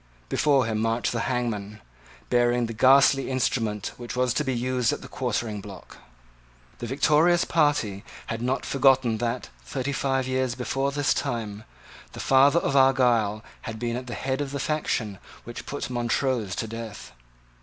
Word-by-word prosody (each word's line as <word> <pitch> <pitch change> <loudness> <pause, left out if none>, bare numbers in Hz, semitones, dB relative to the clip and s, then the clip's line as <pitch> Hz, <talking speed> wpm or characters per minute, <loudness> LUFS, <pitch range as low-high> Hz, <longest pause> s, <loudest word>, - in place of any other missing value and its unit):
Before 140 -4 +3
him 110 -1 -1
marched 115 +1 0
the 115 +1 -2
hangman, 110 -5 -3 0.5
bearing 120 0 +3
the 115 - -5
ghastly 135 +3 +5
instrument 115 -5 -1
which 120 0 -7
was 125 -1 +1
to 150 - 0
be 135 - -1
used 125 -1 0
at - - -5
the - - -8
quartering 105 -3 -3
block. 100 -2 -11 0.8
The 120 - -5
victorious 155 +6 +3
party 145 -11 +1 0.2
had 115 0 -4
not 125 +2 -1
forgotten 130 -4 +3
that, 120 0 -2
thirty 130 - -3
five 135 -1 0
years 130 -1 0
before 135 +2 -1
this 145 0 +1
time, 110 -6 -4 0.5
the - - -8
father 135 +4 +5
of 140 -5 0
Argyle 120 -6 +3 0.2
had 115 -2 -6
been 120 +1 -2
at 125 0 -5
the 120 - -5
head 135 +1 -2
of 140 - -3
the 140 +1 -4
faction 120 -10 -2 0.2
which 120 - -8
put 145 - -4
Montrose 120 -4 -1
to - - -2
death. 115 -2 -8
125 Hz, 165 wpm, -25 LUFS, 115-135 Hz, 0.8 s, ghastly